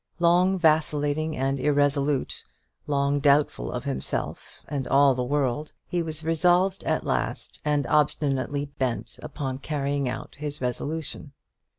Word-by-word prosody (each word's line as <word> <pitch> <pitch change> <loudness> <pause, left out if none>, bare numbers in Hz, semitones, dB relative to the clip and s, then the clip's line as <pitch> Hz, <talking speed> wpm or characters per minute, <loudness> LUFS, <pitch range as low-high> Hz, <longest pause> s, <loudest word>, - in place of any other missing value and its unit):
Long 180 +2 +4
vacillating 155 -1 +1
and 135 +1 0
irresolute, 145 -1 +1 0.4
long 140 0 +1
doubtful 140 - +2
of - - -4
himself 65 - -3
and 140 -3 -3
all 140 0 +5
the 125 - -2
world, 145 +2 -1
he 175 - -1
was 160 -1 -4
resolved 180 +4 +2
at - - 0
last, - - -2
and 150 -2 +1
obstinately 145 -1 +1
bent 130 -3 -2
upon 135 -2 -4
carrying 140 -2 -1
out - - -6
his 150 0 -4
resolution. 140 +3 -4
145 Hz, 125 wpm, -26 LUFS, 135-155 Hz, 0.4 s, all